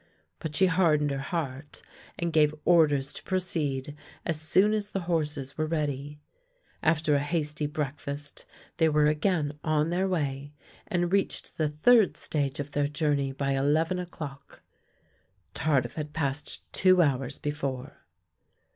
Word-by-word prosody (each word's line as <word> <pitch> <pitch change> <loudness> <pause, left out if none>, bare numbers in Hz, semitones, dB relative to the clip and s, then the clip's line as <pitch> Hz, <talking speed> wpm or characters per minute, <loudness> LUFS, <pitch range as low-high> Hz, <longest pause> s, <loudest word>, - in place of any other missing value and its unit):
But 155 -2 -5
she 190 - +5
hardened 160 -5 +3
her 135 - -2
heart 140 -1 -4 0.3
and 170 -1 -2
gave 155 -1 +4
orders 145 -5 +4
to - - -7
proceed 150 -7 -2 0.3
as 160 -2 -1
soon 190 +6 +4
as 210 -1 -1
the 195 - -3
horses 150 -5 -2
were 155 - +1
ready. 150 -2 -2 0.6
After 160 -2 +2
a 145 - +4
hasty 150 0 -1
breakfast 145 -1 -4 0.3
they 160 -1 +4
were 150 0 +3
again 150 -1 +1
on 155 0 +1
their 185 +2 +1
way, 145 -5 -2 0.3
and 175 0 0
reached 200 -1 -1
the 155 -1 +2
third 210 +8 +4
stage 145 -2 -2
of 145 0 -4
their 145 -1 +1
journey 145 -2 0
by 140 +1 -2
eleven 155 +6 +1
o'clock. 150 -6 -8 0.9
Tardif 140 -5 +1
had 150 -1 -5
passed 145 -2 -3
two 185 -2 +5
hours 135 -2 -1
before. 140 -2 -4
150 Hz, 140 wpm, -28 LUFS, 145-165 Hz, 0.9 s, she